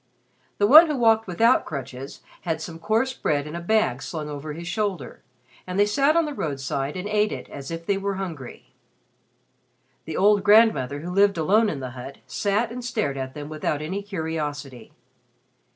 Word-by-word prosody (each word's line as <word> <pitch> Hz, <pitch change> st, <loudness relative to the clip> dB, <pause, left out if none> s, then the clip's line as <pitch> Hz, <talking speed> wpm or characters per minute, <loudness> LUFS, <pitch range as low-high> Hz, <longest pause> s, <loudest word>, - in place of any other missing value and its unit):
The 205 Hz, -, +3 dB
one 310 Hz, +9 st, +9 dB
who 300 Hz, -, -1 dB
walked 225 Hz, -2 st, +3 dB
without 230 Hz, +8 st, +3 dB
crutches 135 Hz, -2 st, -7 dB, 0.2 s
had 165 Hz, -3 st, -2 dB
some 165 Hz, +1 st, -8 dB
coarse 225 Hz, +7 st, 0 dB
bread 145 Hz, -, -1 dB
in 150 Hz, +2 st, -7 dB
a 170 Hz, -, -4 dB
bag 220 Hz, +5 st, +1 dB
slung 155 Hz, -3 st, -5 dB
over 150 Hz, +1 st, -6 dB
his 170 Hz, +2 st, -8 dB
shoulder, 190 Hz, -, -3 dB, 0.5 s
and 185 Hz, +2 st, -3 dB
they 205 Hz, -, +6 dB
sat 275 Hz, +9 st, +2 dB
on 335 Hz, -, +3 dB
the 300 Hz, -, -4 dB
roadside 140 Hz, -, -3 dB
and 185 Hz, +2 st, -4 dB
ate 210 Hz, 0 st, +1 dB
it -, -, -6 dB
as 140 Hz, -1 st, -8 dB
if 165 Hz, 0 st, -6 dB
they 195 Hz, +1 st, 0 dB
were 200 Hz, 0 st, -2 dB
hungry. 165 Hz, -10 st, -7 dB, 1.3 s
The 160 Hz, -, -5 dB
old 205 Hz, +1 st, +4 dB
grandmother 205 Hz, -, +4 dB
who 175 Hz, +3 st, -6 dB
lived 200 Hz, -1 st, +3 dB
alone 210 Hz, +8 st, +3 dB
in 140 Hz, -7 st, -4 dB
the 130 Hz, -1 st, -5 dB
hut 130 Hz, +2 st, -9 dB
sat 210 Hz, +3 st, -1 dB
and 250 Hz, +1 st, -6 dB
stared 145 Hz, -, -2 dB
at 130 Hz, -1 st, -5 dB
them 145 Hz, -1 st, -6 dB
without 155 Hz, -1 st, -2 dB
any 180 Hz, +7 st, -4 dB
curiosity. 150 Hz, -, -5 dB
175 Hz, 185 wpm, -24 LUFS, 145-210 Hz, 1.3 s, one